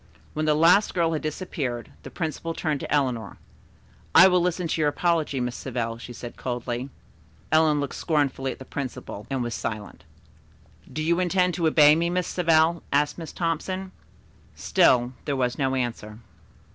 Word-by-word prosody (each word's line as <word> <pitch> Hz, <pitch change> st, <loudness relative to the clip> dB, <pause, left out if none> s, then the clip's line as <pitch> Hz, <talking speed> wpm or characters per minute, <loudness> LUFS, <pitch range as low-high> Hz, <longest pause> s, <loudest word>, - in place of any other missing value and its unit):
When 155 Hz, 0 st, -1 dB
the 155 Hz, -1 st, +3 dB
last 170 Hz, +7 st, +4 dB
girl 165 Hz, -2 st, +2 dB
had 155 Hz, -, -2 dB
disappeared 145 Hz, -, -4 dB
the -, -, -9 dB
principal 165 Hz, 0 st, -4 dB
turned 155 Hz, -4 st, -1 dB
to -, -, -7 dB
Eleanor. 125 Hz, -7 st, 0 dB, 0.8 s
"I 185 Hz, -, +10 dB
will 180 Hz, -1 st, +3 dB
listen 180 Hz, 0 st, -1 dB
to 160 Hz, -, -1 dB
your 150 Hz, -, +3 dB
apology, 160 Hz, -2 st, 0 dB
Miss 125 Hz, 0 st, -2 dB
Savell," 115 Hz, -3 st, -4 dB
she 120 Hz, -, -9 dB
said 120 Hz, 0 st, -9 dB
coldly. 125 Hz, +1 st, -4 dB, 0.6 s
Eleanor 155 Hz, -2 st, +4 dB
looked 140 Hz, -, -4 dB
scornfully 140 Hz, -4 st, 0 dB
at -, -, -8 dB
the 130 Hz, -, -11 dB
principal, 130 Hz, -7 st, -6 dB
and 135 Hz, -2 st, -1 dB
was 120 Hz, -1 st, -3 dB
silent. 105 Hz, -5 st, -5 dB, 0.9 s
"Do 155 Hz, -, -3 dB
you 170 Hz, +2 st, +2 dB
intend 180 Hz, 0 st, +2 dB
to 165 Hz, -2 st, +1 dB
obey 150 Hz, -1 st, +6 dB
me, 170 Hz, +1 st, 0 dB
Miss 180 Hz, 0 st, 0 dB
Savell?" 165 Hz, -1 st, +2 dB
asked 145 Hz, +3 st, +1 dB
Miss 165 Hz, -2 st, -7 dB
Thompson. 185 Hz, +3 st, -3 dB, 0.6 s
Still 125 Hz, 0 st, +3 dB
there 140 Hz, -, -1 dB
was 125 Hz, 0 st, -1 dB
no 135 Hz, -1 st, +1 dB
answer. 115 Hz, -4 st, -3 dB
150 Hz, 170 wpm, -25 LUFS, 125-165 Hz, 0.9 s, I